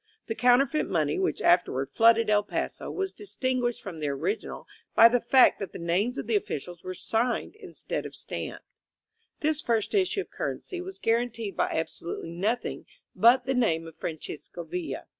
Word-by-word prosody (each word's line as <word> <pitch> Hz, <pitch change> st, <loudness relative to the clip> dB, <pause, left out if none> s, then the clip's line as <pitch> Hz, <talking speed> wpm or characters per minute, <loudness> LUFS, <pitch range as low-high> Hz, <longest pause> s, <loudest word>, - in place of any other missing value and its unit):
The 225 Hz, -, -2 dB
counterfeit 250 Hz, +6 st, +3 dB
money, 380 Hz, -, +1 dB
which 380 Hz, -, -1 dB
afterward 135 Hz, -6 st, +3 dB
flooded 230 Hz, 0 st, +5 dB
El 210 Hz, -1 st, +4 dB
Paso, 205 Hz, -, -4 dB
was 385 Hz, 0 st, -3 dB
distinguished 255 Hz, -, -2 dB
from 175 Hz, -5 st, -7 dB
the 150 Hz, -, -2 dB
original 165 Hz, +10 st, -3 dB, 0.3 s
by 230 Hz, -, +10 dB
the 240 Hz, +1 st, +2 dB
fact 255 Hz, +2 st, +5 dB
that 195 Hz, -, -5 dB
the -, -, -6 dB
names 185 Hz, +9 st, 0 dB
of -, -, -3 dB
the 225 Hz, 0 st, 0 dB
officials 175 Hz, -3 st, -3 dB
were 185 Hz, 0 st, -5 dB
signed 235 Hz, -, -1 dB
instead 405 Hz, -4 st, -5 dB
of -, -, -13 dB
stamped. -, -, -6 dB, 0.8 s
This 310 Hz, 0 st, +1 dB
first 225 Hz, -5 st, 0 dB
issue 395 Hz, 0 st, +2 dB
of -, -, -11 dB
currency 365 Hz, -2 st, -4 dB
was 380 Hz, +1 st, -8 dB
guaranteed 230 Hz, -3 st, -1 dB
by -, -, +1 dB
abso 160 Hz, -, -3 dB
lutely 165 Hz, -1 st, -5 dB
nothing 210 Hz, +8 st, -2 dB, 0.3 s
but 245 Hz, +2 st, +5 dB
the 265 Hz, -, 0 dB
name 170 Hz, -11 st, +1 dB
of 165 Hz, -1 st, -11 dB
Francisco 160 Hz, +1 st, -6 dB
Villa. 345 Hz, -, -5 dB
230 Hz, 175 wpm, -27 LUFS, 180-260 Hz, 0.8 s, by